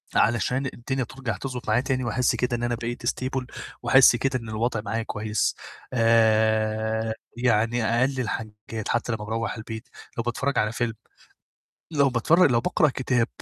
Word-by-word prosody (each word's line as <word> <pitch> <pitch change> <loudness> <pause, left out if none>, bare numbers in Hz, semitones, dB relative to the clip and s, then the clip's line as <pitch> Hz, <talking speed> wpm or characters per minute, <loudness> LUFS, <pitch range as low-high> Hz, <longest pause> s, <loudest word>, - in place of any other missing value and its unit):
علشان 120 +4 +2
الدنيا 130 +2 -2
ترجَع 120 -6 -5
تضبُط 125 +1 -6
معايا 110 +3 +3
تاني 130 -1 -1
وأحس 120 +2 +1
كده 125 -1 0
إن 120 - -5
أنا 120 0 0
بقيت 120 +1 -5
stable 130 0 -2 0.4
وأحس 135 -2 +7
كده 130 +1 0
إن 115 -1 -9
الوضع 110 0 -1
معايا 110 +2 -2
كويس. 105 -1 -1 0.4
آآ 110 -1 +2 0.2
يعني 115 -1 +2
أقل 130 +4 +1
الحاجات 110 -2 -5
حتى 120 +1 0
لمّا 105 -2 -3
باروّح 115 +1 -2
البيت 110 +2 -7 0.3
لو 115 - 0
باتفرّج 125 +3 -1
على 105 0 +1
فيلم، 115 -1 -1 1.0
لو 140 -3 +3
باتفرّج 145 +6 +4
لو 115 - +3
باقرأ 170 -2 +2
كتاب 125 -3 0
120 Hz, 155 wpm, -25 LUFS, 110-130 Hz, 1.0 s, وأحس